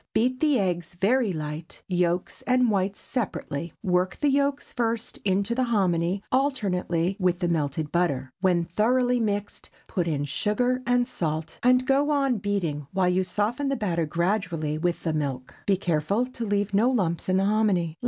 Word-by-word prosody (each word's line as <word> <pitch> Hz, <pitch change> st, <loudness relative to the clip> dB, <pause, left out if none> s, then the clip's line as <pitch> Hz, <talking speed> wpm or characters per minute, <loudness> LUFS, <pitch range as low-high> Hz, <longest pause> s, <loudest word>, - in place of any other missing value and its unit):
Beat 255 Hz, +3 st, +2 dB
the 300 Hz, -3 st, +3 dB
eggs 175 Hz, -3 st, -2 dB
very 225 Hz, +2 st, +3 dB
light, 155 Hz, 0 st, -6 dB
yolks 175 Hz, -1 st, 0 dB
and 250 Hz, -2 st, +3 dB
whites 195 Hz, 0 st, 0 dB
separately. 170 Hz, -, -4 dB
Work 180 Hz, -1 st, +1 dB
the 290 Hz, -2 st, +2 dB
yolks 280 Hz, 0 st, 0 dB
first 230 Hz, -2 st, -2 dB
into 200 Hz, +3 st, +1 dB
the 255 Hz, +1 st, +1 dB
hominy, 190 Hz, -4 st, +1 dB
alternately 195 Hz, -, 0 dB
with 180 Hz, -2 st, +2 dB
the 175 Hz, -1 st, -1 dB
melted 150 Hz, -2 st, -1 dB
butter. 140 Hz, -7 st, 0 dB
When 180 Hz, -3 st, +3 dB
thoroughly 245 Hz, +8 st, +2 dB
mixed, 205 Hz, -2 st, -3 dB, 0.2 s
put 175 Hz, -3 st, -2 dB
in 145 Hz, -3 st, -1 dB
sugar 245 Hz, -, 0 dB
and 245 Hz, 0 st, +3 dB
salt, 160 Hz, -1 st, -3 dB
and 255 Hz, +1 st, +4 dB
go 275 Hz, +2 st, +2 dB
on 275 Hz, -6 st, +2 dB
beating 175 Hz, -8 st, -2 dB
while 185 Hz, -1 st, +2 dB
you 185 Hz, +1 st, +2 dB
soften 235 Hz, +9 st, -1 dB
the 275 Hz, -, +1 dB
batter 170 Hz, -, -1 dB
gradually 170 Hz, -3 st, -1 dB
with 175 Hz, +1 st, -1 dB
the 160 Hz, -, 0 dB
milk. 135 Hz, -4 st, -3 dB
Be 195 Hz, -2 st, +3 dB
careful 180 Hz, +5 st, 0 dB
to 250 Hz, -2 st, -6 dB
leave 205 Hz, 0 st, 0 dB
no 220 Hz, +5 st, +4 dB
lumps 185 Hz, -9 st, 0 dB
in 185 Hz, -, +3 dB
the 195 Hz, -, +2 dB
hominy. 200 Hz, -6 st, +1 dB
195 Hz, 170 wpm, -26 LUFS, 170-240 Hz, 0.2 s, and